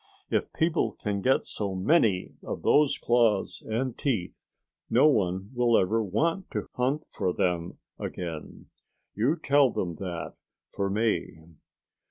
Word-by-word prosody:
If - - 0
people 165 0 +1
can 100 -2 -3
get 130 +4 +2
so 100 -3 -4
many 100 - +2
of - - -5
those 150 -1 +4
claws 115 -4 +2
and 120 +3 -2
teeth, 110 -11 -1 0.6
no 125 +5 +5
one 95 -7 +1
will 120 -2 +3
ever 110 +5 +2
want 165 - -1
to - - -3
hunt 135 +5 0
for 90 - 0
them 90 -1 -1 0.2
again. 85 -4 -6 0.4
You 120 +10 +1
tell 140 -3 +4
them 85 -7 -3
that, 90 -3 -5 0.4
for 100 0 -2
me." 105 -4 0
110 Hz, 135 wpm, -27 LUFS, 95-135 Hz, 0.6 s, no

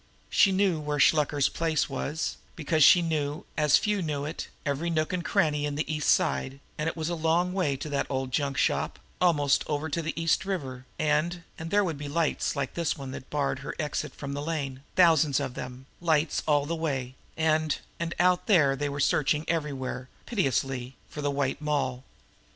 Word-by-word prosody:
She 195 - +5
knew 190 -4 +2
where 150 -1 -2
Shluker's 145 -1 +4
place 165 -2 0
was, 145 +3 -3 0.2
because 155 -1 +2
she 175 +4 +8
knew, 150 -2 -2
as 150 -2 +5
few 210 -2 0
knew 145 -4 -2
it, 155 - -5 0.2
every 145 +4 -1
nook 155 +1 0
and 180 -1 -1
cranny 150 -3 +1
in 145 -1 -2
the 150 - -1
East 150 0 0
Side, 140 -6 +1 0.2
and 150 +2 -1
it 165 - -7
was 160 -1 -2
a 175 - -1
long 170 +2 +1
way 160 -8 0
to 145 - -6
that 140 -1 -1
old 130 -1 -2
junk 140 +1 -1
shop, - - +1 0.2
almost 145 -6 +3
over 150 +1 -2
to 165 +3 -1
the 160 +1 -3
East 165 0 +2
River, 130 -10 -4
and 155 +3 0 0.2
and 160 +1 -5
there 205 +3 +3
would 165 -6 -3
be 145 - -5
lights 155 +1 0
like 140 -2 -2
this 170 -2 -1
one 135 -2 -7
here - - -5
that 130 - -20
barred 145 -2 -1
her 140 - -6
exit 150 -2 -3
from 140 -1 -5
the 145 - -3
lane, 145 -4 -3
thousands 160 -6 +5
of 125 - -3
them, 125 +1 -7
lights 160 -2 +1
all 145 -2 +3
the 165 +3 -2
way, 135 -6 -2 0.2
and 155 -1 +2 0.2
and 170 0 -3
out 180 0 +3
there 145 -9 +5
they 145 +1 -2
were 140 0 -4
searching 150 +2 +2
everywhere, 135 -5 -2 0.2
pitilessly, 135 - -1
for 150 - -6
the 145 - 0
White 140 0 -1
Moll. 140 -4 -1
150 Hz, 200 wpm, -28 LUFS, 140-165 Hz, 0.2 s, she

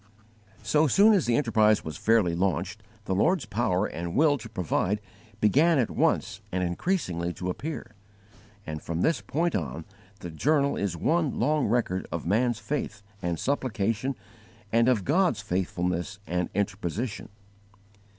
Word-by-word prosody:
So 155 +1 +3
soon 205 - +6
as 190 - +2
the 120 - +3
enterprise 110 -5 +3
was 80 -2 -5
fairly 110 -4 +2
launched, 95 +2 -1 0.2
the - - -1
Lord's 160 - +2
power 105 -3 0
and 85 0 -5
will 150 0 +4
to 115 - -9
provide 95 +1 -1 0.4
began 145 - +4
at 125 -5 +1
once - - 0
and 90 0 -1
increasingly 90 - -1
to 90 +1 -3
appear; 145 - -6 0.7
and, 75 -1 -5
from 85 +1 -3
this 160 - +2
point 165 +3 -1
on, 80 -2 -3 0.4
the 85 - -6
journal 140 - +2
is 95 -4 -2
one 160 - +1
long 150 -1 +2
record 105 -5 0
of 85 -1 -4
man's 115 +6 +2
faith 110 -7 -4 0.2
and 85 -2 -1
supplication 120 - -1 0.6
and 115 +2 +4
of 110 -7 +1
God's 170 - +2
faithfulness 90 -1 -2
and 90 -2 -1
interposition. 100 +3 -3
105 Hz, 145 wpm, -27 LUFS, 90-140 Hz, 0.7 s, soon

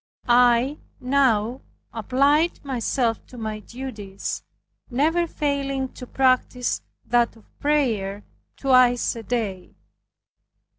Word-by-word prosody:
I 245 +3 +4 0.2
now 250 -3 +2 0.3
applied 280 - +2
myself 245 -2 -1
to 250 - -13
my 215 -2 -4
duties, 215 -4 -6 0.5
never 320 +7 +1
failing 275 -3 -1
to 250 - -10
practice 255 -1 +1 0.2
that 240 -1 +2
of 225 - -19
prayer 220 -10 0 0.3
twice 255 -3 +4
a 230 - -6
day. 210 -5 -3
250 Hz, 95 wpm, -24 LUFS, 225-275 Hz, 0.5 s, I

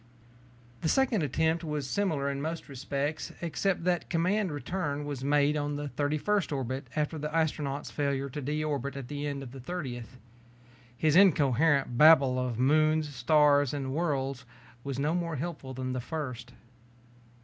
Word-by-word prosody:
The 160 - 0
second 255 -4 +2
attempt 160 +3 +1
was 150 -3 -3
similar 155 -4 0
in 140 0 -2
most 160 +2 -4
respects, 140 +2 -3
except 175 +2 -1
that 175 -1 0
command 185 +3 +1
return 145 0 -3
was 140 -3 -5
made 145 +1 +3
on 145 0 -1
the 145 0 -4
thirty 145 +2 -1
first 205 +4 0
orbit 130 -1 -3
after 155 +1 -1
the 150 +1 -4
astronaut's 150 -3 -1
failure 140 -2 -1
to 140 +2 -6
de 150 +3 -2
orbit 140 -2 -2
at 135 -3 -7
the 145 0 -3
end 140 -1 -4
of 125 - -9
the 135 - -9
thirtieth. 130 -5 -6 0.8
His 155 -1 +2
incoherent 145 -7 +4
babble 140 -5 +7
of 125 -3 -2
moons, 155 +3 +2
stars, 145 +1 +3
and 135 -2 -3
worlds 135 -5 -1 0.4
was 140 -2 -4
no 145 +3 0
more 170 -2 -1
helpful 145 -3 -5
than 130 0 -3
the 130 - -2
first. 125 -5 -5
145 Hz, 160 wpm, -29 LUFS, 135-160 Hz, 0.8 s, babble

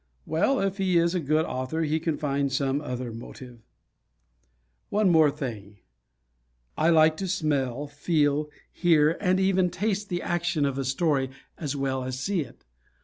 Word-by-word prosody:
Well, 205 - +1
if 195 0 -1
he 185 -2 +2
is 170 +1 +2
a 180 - +1
good 155 +1 +1
author 130 +6 -2
he 155 +1 0
can 160 -1 -2
find 140 -2 -1
some 135 +1 0
other 125 -4 -4
motive. 120 +1 -10 1.3
One 205 -3 +3
more 160 -3 +6
thing. 110 -9 -6 1.0
I 160 +2 +2
like 155 -1 +5
to 195 - -3
smell, 145 -7 -1
feel, 145 0 0 0.2
hear 160 -2 +3
and 185 -1 +2
even 190 -1 +2
taste 205 +3 -2
the 175 -2 -2
action 175 -3 0
of 140 -1 -1
a 135 - -2
story 135 0 +1 0.3
as 145 -3 -4
well 135 -1 -1
as 130 0 -4
see 190 +7 -1
it. 130 -5 -11
155 Hz, 160 wpm, -26 LUFS, 135-175 Hz, 1.3 s, more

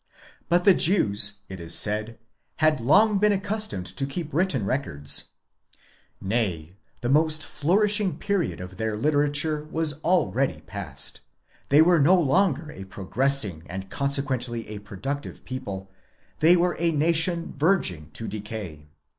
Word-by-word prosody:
But 175 +1 +3
the 195 - +7
Jews, 100 - +2
it 95 -1 -8
is 85 0 -1
said, 110 +2 +1 0.4
had 155 -4 +2
long 205 - +4
been 210 +1 +4
accustomed 205 - -2
to 135 +8 -3
keep 155 +2 -6
written 150 - +1
records; 75 - -1 0.9
nay, 95 -6 -2 0.3
the 120 - -2
most 155 +2 +2
flourishing 200 +6 +2
period 200 -4 -1
of 90 +1 -9
their 110 -1 -2
literature 145 +3 +1
was 155 -1 -1
already 155 -7 +1
past, 80 -9 -6 0.5
they 145 +3 +6
were 175 0 +4
no 180 +6 +5
longer 160 -1 +1
a 95 - -9
progressing 100 - -1
and 95 +1 -7
consequently 130 -5 -1
a 105 -1 -6
productive 105 +8 -6
people, 100 -8 -6 0.5
they 165 +3 +6
were 175 0 +1
a 170 0 +2
nation 165 +2 +1
verging 135 - +1
to 115 - -4
decay. 100 -8 -7
140 Hz, 135 wpm, -25 LUFS, 100-165 Hz, 0.9 s, the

